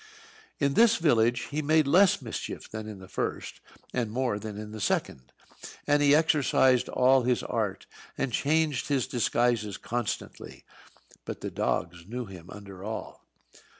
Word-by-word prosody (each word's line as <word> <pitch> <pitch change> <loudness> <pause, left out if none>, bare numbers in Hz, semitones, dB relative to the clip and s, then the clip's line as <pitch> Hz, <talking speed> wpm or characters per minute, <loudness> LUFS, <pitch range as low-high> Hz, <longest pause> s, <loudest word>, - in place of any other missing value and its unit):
In 140 -1 +1
this 230 +6 +5
village 120 - +2
he 150 +2 -1
made 155 +1 +3
less 180 +7 +4
mischief - - -6
than 110 0 -7
in 105 -2 -7
the 95 -1 -12
first, - - -4 0.3
and 120 -3 -1
more 120 -2 -1
than 105 -1 -7
in 105 0 -7
the 110 -1 -7
second. 65 -8 -2 0.5
And 145 0 +3
he 145 0 +6
exercised 140 -5 +3
all 130 +1 +4
his 125 0 0
art, - - -2 0.3
and 135 -3 -2
changed 150 0 +1
his 140 -4 +1
disguises 120 -4 0
constantly; 120 -2 -5 0.6
but - - -7
the - - -4
dogs 85 0 -2
knew 125 +3 -4
him 90 -3 -12
under 100 -2 -10
all. 110 +2 -7
120 Hz, 150 wpm, -28 LUFS, 105-145 Hz, 0.6 s, he